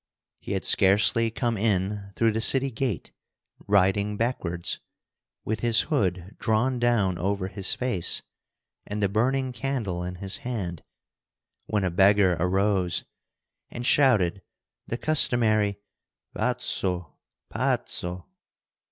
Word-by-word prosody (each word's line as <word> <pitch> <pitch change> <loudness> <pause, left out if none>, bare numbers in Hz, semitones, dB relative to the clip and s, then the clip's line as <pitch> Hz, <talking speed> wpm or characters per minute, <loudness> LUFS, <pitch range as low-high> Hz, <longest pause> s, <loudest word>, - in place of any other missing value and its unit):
He - - -5
had - - -2
scarcely 105 +4 +3
come 115 0 -2
in 100 -1 -1
through 115 -1 +2
the 110 +1 -2
city 135 +3 +6
gate—riding 100 - -2
backwards, 90 -8 -2 0.7
with 110 +1 -2
his 115 -2 +4
hood 95 0 -2
drawn 120 +3 0
down 110 -7 +1
over 100 0 -1
his 100 -2 -1
face 120 -9 0 0.6
and 105 0 -3
the - - +4
burning 130 +6 0
candle 115 -8 -3
in 90 0 -5
his 95 +1 -3
hand—when 105 - -7
a 90 - 0
beggar 95 0 +4
arose 95 0 +1 0.7
and 120 0 -6
shouted 105 - +3 0.5
the 115 - -3
customary 110 -9 +3 0.6
"Pazzo, 90 -3 -2 0.4
pazzo!" 90 0 -2
105 Hz, 110 wpm, -25 LUFS, 95-120 Hz, 0.7 s, city